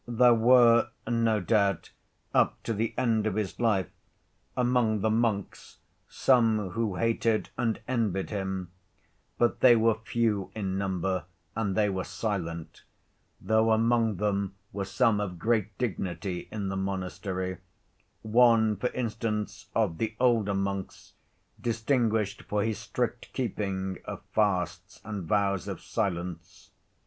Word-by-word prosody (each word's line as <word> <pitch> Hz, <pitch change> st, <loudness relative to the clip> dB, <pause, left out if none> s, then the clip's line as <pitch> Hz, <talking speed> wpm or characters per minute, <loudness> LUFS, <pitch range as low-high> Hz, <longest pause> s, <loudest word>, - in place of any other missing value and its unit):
There 120 Hz, +1 st, +5 dB
were, 120 Hz, 0 st, +5 dB, 0.2 s
no 115 Hz, -2 st, +2 dB
doubt, 100 Hz, -1 st, +1 dB, 0.4 s
up -, -, +2 dB
to 115 Hz, -, -1 dB
the 110 Hz, +2 st, -2 dB
end 115 Hz, -4 st, +2 dB
of 105 Hz, -, -1 dB
his 105 Hz, -3 st, -3 dB
life, 105 Hz, -6 st, +1 dB, 0.7 s
among 120 Hz, -4 st, +2 dB
the 110 Hz, -, +2 dB
monks 110 Hz, -3 st, -1 dB, 0.3 s
some 110 Hz, -6 st, +2 dB
who 110 Hz, -1 st, -1 dB
hated 115 Hz, 0 st, 0 dB
and 115 Hz, -3 st, -1 dB
envied 110 Hz, -7 st, -1 dB
him, 95 Hz, -3 st, -3 dB, 0.7 s
but 120 Hz, -1 st, +2 dB
they 125 Hz, -2 st, +7 dB
were 115 Hz, 0 st, +4 dB
few 110 Hz, -3 st, -1 dB
in 95 Hz, -3 st, -2 dB
number 95 Hz, -3 st, -1 dB, 0.3 s
and 105 Hz, -4 st, -1 dB
they 105 Hz, -1 st, +4 dB
were 95 Hz, -2 st, -2 dB
silent, 85 Hz, -8 st, -4 dB, 0.6 s
though 110 Hz, +1 st, +2 dB
among 115 Hz, -1 st, +3 dB
them 100 Hz, 0 st, -1 dB, 0.2 s
were 100 Hz, 0 st, -3 dB
some 105 Hz, +2 st, +2 dB
of 95 Hz, -4 st, -3 dB
great 110 Hz, 0 st, 0 dB
dignity 90 Hz, -5 st, -3 dB
in 100 Hz, -3 st, -3 dB
the 95 Hz, -, -3 dB
monastery, 95 Hz, -1 st, -3 dB, 0.6 s
one, 110 Hz, -1 st, +4 dB
for 125 Hz, +6 st, -1 dB
instance, 105 Hz, -4 st, -3 dB
of 105 Hz, -8 st, +1 dB
the 110 Hz, -1 st, -2 dB
older 115 Hz, -5 st, +3 dB
monks 100 Hz, -1 st, -4 dB, 0.5 s
distinguished 115 Hz, -3 st, 0 dB
for 105 Hz, 0 st, -1 dB
his 110 Hz, -2 st, -2 dB
strict 120 Hz, +1 st, -3 dB
keeping 95 Hz, -6 st, -2 dB
of -, -, -7 dB
fasts 95 Hz, -2 st, 0 dB
and 105 Hz, -5 st, -5 dB
vows 100 Hz, -3 st, +1 dB
of -, -, -4 dB
silence. 90 Hz, -3 st, -4 dB
105 Hz, 130 wpm, -28 LUFS, 95-115 Hz, 0.7 s, they